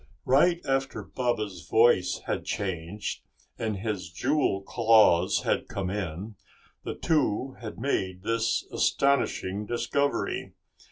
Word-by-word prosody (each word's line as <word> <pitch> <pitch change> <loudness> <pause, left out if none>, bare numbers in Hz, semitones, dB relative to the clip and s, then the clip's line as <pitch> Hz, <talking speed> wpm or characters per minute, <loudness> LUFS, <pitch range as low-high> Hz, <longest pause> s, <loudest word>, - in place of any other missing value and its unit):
Right 170 +7 +4
after 135 0 -1
Baba's 110 -8 -3
voice 110 -5 +4
had - - -2
changed 95 +1 -4 0.4
and 110 -3 -2
his 100 -4 -3
jewel 125 - 0
claws 110 -6 +4
had - - 0
come 95 -2 -3
in, 100 +1 -5 0.5
the - - -4
two 135 -5 0
had 110 -2 -7
made 95 -9 -2
this 115 +1 0
astonishing 105 -7 +1
discovery. 120 +5 -1
110 Hz, 110 wpm, -27 LUFS, 95-130 Hz, 0.5 s, Right